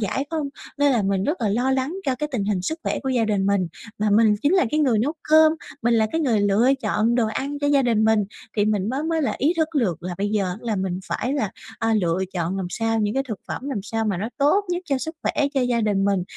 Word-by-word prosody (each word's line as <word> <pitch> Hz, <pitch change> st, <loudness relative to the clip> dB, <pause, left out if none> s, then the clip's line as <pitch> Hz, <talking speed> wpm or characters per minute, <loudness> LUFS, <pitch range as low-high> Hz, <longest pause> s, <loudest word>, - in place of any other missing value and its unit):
giải 225 Hz, +7 st, -1 dB
không, 310 Hz, -3 st, -2 dB, 0.3 s
nên 285 Hz, -1 st, +4 dB
là 230 Hz, -, +2 dB
mình 195 Hz, -1 st, 0 dB
rất 305 Hz, -, 0 dB
là 220 Hz, -, +1 dB
lo 245 Hz, +6 st, +1 dB
lắng 265 Hz, +4 st, 0 dB
cho 260 Hz, -, +2 dB
cái 300 Hz, +4 st, -3 dB
tình 215 Hz, -6 st, -1 dB
hình 200 Hz, -3 st, -1 dB
sức 315 Hz, -, -2 dB
khỏe -, -, -1 dB
của 265 Hz, -, -2 dB
gia 245 Hz, -3 st, +2 dB
đình 200 Hz, -3 st, 0 dB
mình. 200 Hz, -3 st, +1 dB, 0.3 s
Mà 210 Hz, 0 st, +1 dB
mình 215 Hz, 0 st, +5 dB
chính 290 Hz, -, +3 dB
là 365 Hz, -, +4 dB
cái 305 Hz, -, +1 dB
người 250 Hz, -7 st, +3 dB
nấu 265 Hz, +8 st, +1 dB, 0.2 s
cơm, 315 Hz, 0 st, +6 dB, 0.3 s
mình 235 Hz, 0 st, +3 dB
là 220 Hz, -1 st, +3 dB
cái 325 Hz, -, 0 dB
người 240 Hz, -9 st, +2 dB
lựa 205 Hz, +4 st, +3 dB
chọn 215 Hz, +2 st, +1 dB
đồ 235 Hz, -2 st, +2 dB
ăn 280 Hz, +6 st, -3 dB
cho 285 Hz, -, -1 dB
gia 285 Hz, -1 st, +4 dB
đình 230 Hz, -3 st, +2 dB
mình, 220 Hz, -2 st, +3 dB, 0.3 s
thì 205 Hz, -, +3 dB
mình 210 Hz, -1 st, 0 dB
mới 270 Hz, +4 st, -2 dB
mới 320 Hz, -1 st, 0 dB
là -, -, 0 dB
ý 300 Hz, +6 st, +3 dB
thức 320 Hz, -1 st, +1 dB
được 180 Hz, -, -1 dB
là 180 Hz, 0 st, -4 dB
bây 200 Hz, +1 st, 0 dB
giờ 195 Hz, -4 st, 0 dB
là 225 Hz, -3 st, -2 dB
mình 190 Hz, -1 st, -2 dB
phải 255 Hz, -, -2 dB
là, 220 Hz, -9 st, -1 dB, 0.3 s
à, 225 Hz, -1 st, +1 dB
lựa 170 Hz, -1 st, 0 dB
chọn 175 Hz, 0 st, -2 dB
làm 190 Hz, -2 st, -2 dB
sao, 225 Hz, +3 st, 0 dB
những 210 Hz, +1 st, 0 dB
cái 270 Hz, -, +1 dB
thực 215 Hz, -5 st, -4 dB
phẩm 270 Hz, -, -4 dB
làm 220 Hz, -8 st, -3 dB
sao 225 Hz, +2 st, -2 dB
mà 205 Hz, -4 st, 0 dB
nó 205 Hz, +5 st, -3 dB
tốt 300 Hz, +9 st, +3 dB
nhất 355 Hz, 0 st, -2 dB
cho 275 Hz, -2 st, 0 dB
sức 320 Hz, +5 st, -5 dB
khỏe 290 Hz, -2 st, +1 dB
cho 270 Hz, -, +2 dB
gia 245 Hz, -2 st, +1 dB
đình 205 Hz, -2 st, +1 dB
mình, 195 Hz, -2 st, +1 dB
225 Hz, 280 wpm, -23 LUFS, 205-275 Hz, 0.3 s, cơm